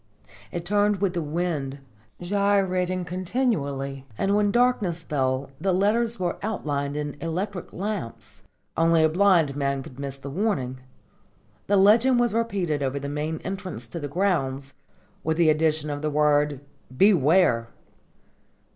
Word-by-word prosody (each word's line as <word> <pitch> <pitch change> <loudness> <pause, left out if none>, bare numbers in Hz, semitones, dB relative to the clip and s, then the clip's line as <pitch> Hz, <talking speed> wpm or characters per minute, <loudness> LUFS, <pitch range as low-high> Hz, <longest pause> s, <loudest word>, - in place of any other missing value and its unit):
It 170 +4 -5
turned 205 +1 +2
with 195 -2 0
the 175 - -1
wind, 150 -3 -2 0.4
gyrating 185 -1 +1
continually, 165 - -2
and 200 +1 +1
when 205 0 +3
darkness 210 -8 +1
fell 135 -2 -1
the 190 -1 +1
letters 225 +4 +1
were 175 -2 -2
outlined 145 -9 -2
in 145 -1 -3
electric 180 +3 -4
lamps. 115 - -5 0.3
Only 165 0 +4
a 160 - +4
blind 170 -5 +3
man 140 -1 -1
could 130 0 -12
miss 140 -1 -5
the 135 0 -8
warning. 135 - -1 0.9
This 205 - +3
legend 225 +6 +5
was 240 -3 +2
repeated 195 -10 -1
over 135 0 -1
the 140 0 -5
main 150 +2 -3
entrance 190 - -5
to 170 - -5
the 145 - -4
grounds, 140 -6 -1 0.5
with 160 0 0
the 165 -2 +5
addition 155 -1 +1
of 145 0 -4
the 155 - -1
word 150 -1 +2 0.4
"Beware!" 165 - +4
165 Hz, 140 wpm, -25 LUFS, 140-200 Hz, 0.9 s, legend